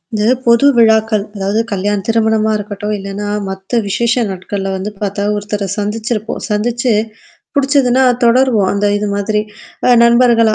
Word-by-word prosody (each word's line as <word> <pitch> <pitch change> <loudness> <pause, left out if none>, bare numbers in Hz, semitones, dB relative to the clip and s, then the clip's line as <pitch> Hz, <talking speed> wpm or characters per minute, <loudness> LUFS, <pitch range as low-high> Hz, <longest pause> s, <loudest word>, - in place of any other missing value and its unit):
இந்த 210 - 0 0.2
பொது 235 +3 +4
விழாக்கள். 220 -2 +3
அதாவது 200 +2 -1
கல்யாணம் 200 0 -1
திருமணமா 220 -1 +1
இருக்கட்டும், 205 0 -5
இல்லைனா 200 +1 -6 0.2
மத்த 190 +5 -2
விசேஷ 235 +4 0
நாட்கள்ல 195 +1 -4
வந்து 195 +3 -5
பாத்தா 200 0 -2
ஒருத்தர 205 -1 -3
சந்திச்சிருப்போம். 215 +1 -3
சந்திச்சு 235 +3 0 0.6
புடிச்சதுனா 270 -2 +2 0.2
தொடருவோம், 235 -5 +3
அந்த 205 0 0
இது 210 0 -2
மாதிரி. 210 +1 -1 0.6
நண்பர்களா 235 -2 +4
215 Hz, 125 wpm, -15 LUFS, 205-235 Hz, 0.6 s, பொது